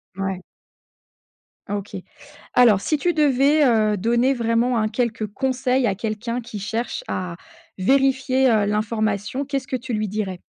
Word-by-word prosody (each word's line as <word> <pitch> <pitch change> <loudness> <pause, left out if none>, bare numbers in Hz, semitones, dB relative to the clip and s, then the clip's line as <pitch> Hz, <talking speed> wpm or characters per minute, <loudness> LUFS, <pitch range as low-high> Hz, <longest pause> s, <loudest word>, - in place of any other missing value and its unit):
Mouais. 190 -1 -3 1.3
OK. 205 0 -4 0.6
Alors 225 -6 +5
si 305 - 0
tu 345 +4 0
devais, 290 0 +3
heu, 215 -4 +3
donner 240 +6 +2
vraiment, 235 0 +1
hein, 215 -1 +1
quelques 225 -2 -2
conseils 255 +3 0
à 195 -3 +1
quelqu'un 225 +3 -3
qui 220 -3 -8
cherche 230 - -3
à 180 -2 -4 0.4
vérifier, 265 +4 +2
heu, 215 -3 +3
l'information, 215 +4 -1
qu'est-ce 275 -2 -3
que 265 - -2
tu 250 0 -5
lui 215 -1 -1
dirais? 195 -3 -4
230 Hz, 140 wpm, -22 LUFS, 210-260 Hz, 1.3 s, Alors